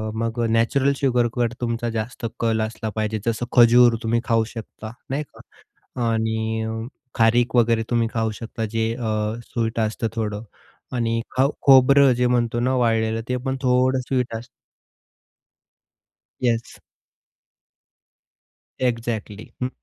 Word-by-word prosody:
मग 115 Hz, +1 st, -2 dB
अ, -, -, +2 dB
नॅचरल 125 Hz, +5 st, +2 dB
शुगरकडे 120 Hz, -3 st, 0 dB
तुमचा 115 Hz, 0 st, -1 dB
जास्त 115 Hz, +3 st, -4 dB
कल 115 Hz, -1 st, +1 dB
असला 110 Hz, 0 st, -3 dB
पाहिजे. 110 Hz, 0 st, -1 dB
जसं 115 Hz, +1 st, -1 dB
खजूर 120 Hz, 0 st, +7 dB
तुम्ही 115 Hz, +1 st, +1 dB
खाऊ 115 Hz, -1 st, +2 dB
शकता, 110 Hz, -1 st, -9 dB, 0.2 s
नाही 140 Hz, +3 st, -1 dB, 0.5 s
का? 120 Hz, -2 st, -4 dB
आणि 110 Hz, 0 st, -1 dB, 0.5 s
खारीक 115 Hz, +1 st, +3 dB
वगैरे 115 Hz, -1 st, +3 dB
तुम्ही 115 Hz, -1 st, +1 dB
खाऊ 110 Hz, -1 st, 0 dB
शकता, 115 Hz, 0 st, -4 dB
जे 115 Hz, 0 st, 0 dB
अ, 115 Hz, -3 st, -3 dB, 0.4 s
स्वीट 115 Hz, -1 st, -2 dB
असतं 110 Hz, +1 st, -1 dB
थोडं. 105 Hz, -1 st, -3 dB, 0.5 s
आणि 115 Hz, -1 st, 0 dB
खाऊ 135 Hz, +2 st, +3 dB
खोबरं 135 Hz, 0 st, +7 dB
जे 125 Hz, +1 st, +1 dB
म्हणतो 120 Hz, -1 st, +1 dB
ना 130 Hz, +2 st, +1 dB
वाळलेलं, 115 Hz, -2 st, +1 dB
ते 125 Hz, -, 0 dB
पण 130 Hz, 0 st, -1 dB
थोडं 130 Hz, 0 st, +2 dB
स्वीट 125 Hz, -3 st, -1 dB
असतं. 115 Hz, +2 st, -7 dB, 1.9 s
येस. 120 Hz, -2 st, -1 dB, 2.0 s
एक्झॅक्टली, 115 Hz, -4 st, -2 dB, 0.2 s
हं, 125 Hz, -, +1 dB
115 Hz, 125 wpm, -22 LUFS, 110-125 Hz, 2.0 s, खजूर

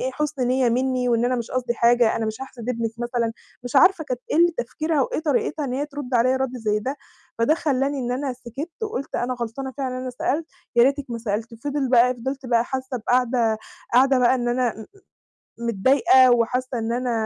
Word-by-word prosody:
إيه 260 Hz, -, -1 dB
حُسن 295 Hz, -4 st, -2 dB
نِيَّة 255 Hz, -1 st, +2 dB
مني، 255 Hz, +1 st, 0 dB
وإن 235 Hz, 0 st, +2 dB
أنا 255 Hz, +1 st, +1 dB
مش 235 Hz, -1 st, -5 dB
قصدي 250 Hz, -2 st, -1 dB
حاجة، 235 Hz, 0 st, +3 dB
أنا 225 Hz, -, -1 dB
مش 220 Hz, +3 st, -5 dB
هاحسد 250 Hz, -3 st, -9 dB
ابنِك 230 Hz, -2 st, -1 dB
مثلًا، 240 Hz, -1 st, -1 dB, 0.3 s
مش 245 Hz, +3 st, -2 dB
عارفة 330 Hz, +2 st, +5 dB
كانت 255 Hz, -3 st, -4 dB
إيه -, -, +1 dB
ال 340 Hz, 0 st, +4 dB
تفكيرها 305 Hz, +4 st, -1 dB
وإيه 305 Hz, -, -2 dB
طريقتها 300 Hz, 0 st, 0 dB
إن 250 Hz, -, -3 dB
هي 285 Hz, +3 st, -1 dB
ترد 285 Hz, -3 st, -6 dB
عليَّ 250 Hz, +2 st, +3 dB
رد 260 Hz, -1 st, -2 dB
زي 210 Hz, -2 st, 0 dB
ده، 265 Hz, +6 st, -3 dB, 0.4 s
فده 230 Hz, +7 st, +3 dB
خلّاني 280 Hz, -2 st, 0 dB
إن 245 Hz, 0 st, -2 dB
أنا 265 Hz, +1 st, -2 dB
سكِتّ 260 Hz, +7 st, -7 dB
وقُلت 430 Hz, -, -4 dB
أنا 250 Hz, +1 st, -1 dB
غلطانة 245 Hz, +3 st, -5 dB
فعلًا 260 Hz, -2 st, -2 dB
إن 255 Hz, -, -4 dB
أنا 255 Hz, -, -4 dB
سألت، 295 Hz, +5 st, -2 dB, 0.3 s
يا 235 Hz, -, +7 dB
ريتِك 280 Hz, +1 st, +1 dB
ما 235 Hz, -, -3 dB
سألتِ، 225 Hz, +1 st, -3 dB
فِضِل 285 Hz, -2 st, -1 dB
بقى 250 Hz, 0 st, +5 dB
فِضِلت 265 Hz, +2 st, -5 dB
بقى 235 Hz, -1 st, +2 dB
حاسة 260 Hz, 0 st, -4 dB
بقاعدة 240 Hz, -1 st, +1 dB, 0.4 s
قاعدة 265 Hz, +1 st, +5 dB
بقى 250 Hz, +1 st, +4 dB
إن 240 Hz, -1 st, -1 dB
أنا 240 Hz, -3 st, -1 dB, 0.7 s
م 235 Hz, -, -3 dB
متضايقة 260 Hz, +3 st, +5 dB
وحاسة 245 Hz, +1 st, 0 dB
إن 225 Hz, +1 st, -2 dB
أنا 250 Hz, 0 st, -1 dB
255 Hz, 210 wpm, -23 LUFS, 235-270 Hz, 0.7 s, يا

